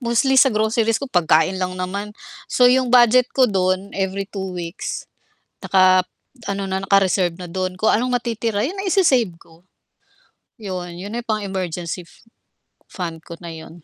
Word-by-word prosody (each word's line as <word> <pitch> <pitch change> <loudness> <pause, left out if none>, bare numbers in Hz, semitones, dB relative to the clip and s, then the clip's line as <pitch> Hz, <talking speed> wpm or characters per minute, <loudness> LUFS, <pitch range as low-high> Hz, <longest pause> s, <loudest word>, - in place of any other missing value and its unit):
Mostly 255 +2 +3
sa 270 - +6
groceries 220 0 +1
ko - - -4
pagkain 175 +2 +2
lang 185 0 -2
naman. 200 +4 -5 0.3
So, 250 - +3
'yong 255 0 +4
budget 245 0 +5
ko 265 - +6
do'n, 190 -2 0
every 195 0 -2
2 190 -2 -6
weeks 170 +2 -5 0.6
nakap 185 -1 +4 0.4
ano 195 -1 -3
na, 190 0 -1
naka-reserve 190 -3 +2
na 175 - -7
do'n. 185 +1 -3
Kung 220 - +2
anong 250 +3 +1
matitira 225 -3 -2
'yon 320 - -3
na 390 - -3
ise-save 275 - +3
ko. 165 +2 -21 1.0
'Yon. 180 -4 -5
'Yon 205 +4 -6
ay 240 - -6
pang 215 -1 -1
emergency 180 -2 -4
f - - -21 0.7
fund 170 -4 -6
ko 170 - -8
na 170 - -6
'yon. 160 +1 -11
195 Hz, 165 wpm, -21 LUFS, 185-230 Hz, 1.0 s, sa